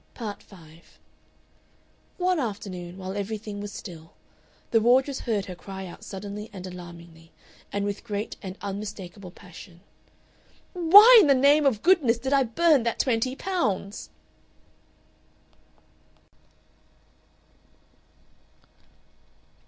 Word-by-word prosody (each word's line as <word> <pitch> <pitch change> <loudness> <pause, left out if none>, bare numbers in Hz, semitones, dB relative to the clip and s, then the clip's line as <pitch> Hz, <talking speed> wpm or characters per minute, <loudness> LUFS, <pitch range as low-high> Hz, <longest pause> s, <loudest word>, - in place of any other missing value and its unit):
Part 215 -4 -6
5 165 -3 -18 1.2
One 365 -1 +1
afternoon, 190 -7 -5
while 190 0 -6
everything 205 0 -5
was 205 0 -6
still, 165 -5 -10 0.6
the 225 - +4
wardress 260 +4 +3
heard 210 -5 -2
her 185 - -7
cry 190 +1 -9
out 175 - -11
suddenly 205 +2 -7
and 190 -3 -9
alarmingly, 170 -2 -12 0.4
and 200 0 -2
with 205 0 -4
great 210 -1 -4
and 190 -1 -8
unmistakable 200 -2 -7
passion, 180 0 -14 0.9
"Why 405 +7 +9
in 320 - +3
the 275 - +5
name 285 +3 +4
of 225 -6 0
goodness 315 -11 +4
did 265 +4 -3
I 275 - +4
burn 290 +4 +3
that 230 0 -2
twenty 255 +1 0
pounds?" 215 - -3
205 Hz, 105 wpm, -25 LUFS, 190-260 Hz, 1.2 s, Why